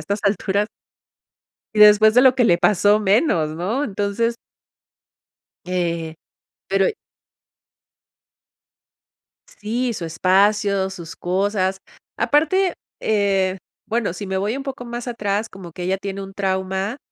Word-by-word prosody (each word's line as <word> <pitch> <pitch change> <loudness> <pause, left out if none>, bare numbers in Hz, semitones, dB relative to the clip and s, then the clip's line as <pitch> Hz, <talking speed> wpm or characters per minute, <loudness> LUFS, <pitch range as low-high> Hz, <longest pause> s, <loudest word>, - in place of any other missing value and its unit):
estas 200 +7 -3
alturas". 200 +1 0 1.1
Y 210 - 0
después 210 +1 +7
de 250 - +6
lo 260 -1 +5
que 250 - +3
le 175 -6 +4
pasó 205 +2 +3
menos, 195 - +2
¿no?, 220 - -1
entonces 205 +4 -1 1.3
Eh, 170 -3 -2 0.5
pero 195 0 +2 2.6
Sí, 235 +3 -3
su 170 - -5
espacio, 195 +3 +2
sus 175 -3 -9
cosas, 190 +1 -1 0.4
aparte, 350 +5 +2 0.3
eh, 195 -3 +1 0.3
bueno, 225 -6 -1
si 205 - -6
me 190 0 -2
voy 210 +5 -1
un 275 - -5
poco 265 -3 -6
más 240 +1 -6
atrás, 210 -2 -2
como 185 -3 -11
que 180 - -7
ella 190 +2 0
tiene 195 0 -5
un 195 0 -9
trauma, 190 +3 -2
200 Hz, 125 wpm, -21 LUFS, 190-220 Hz, 2.6 s, después